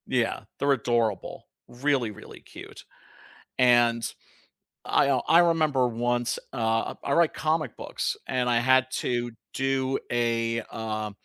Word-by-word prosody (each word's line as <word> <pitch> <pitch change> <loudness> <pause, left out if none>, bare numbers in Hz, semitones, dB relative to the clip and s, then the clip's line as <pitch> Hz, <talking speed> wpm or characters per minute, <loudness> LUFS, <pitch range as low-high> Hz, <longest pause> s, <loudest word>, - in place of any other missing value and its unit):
Yeah, 120 -3 0 0.2
they're 140 +1 +2
adorable, 120 -6 -1 0.2
really, 130 -2 0
really 105 - -12
cute, - - -12 0.7
and 120 -2 +4 0.8
I, 140 - +2
uh, 130 -2 +2
I 165 - +6
remember 155 -7 +3
once, 120 +1 -1 0.2
uh 115 -2 0
I 140 - -1
write 170 +1 +3
comic 155 -5 -1
books, - - -3
and 125 -1 0
I 120 - +3
had 130 +1 +4
to 120 -1 -1 0.2
do 135 0 0
a, 115 -1 0
uh, 110 -1 -4
120 Hz, 130 wpm, -26 LUFS, 115-135 Hz, 0.8 s, I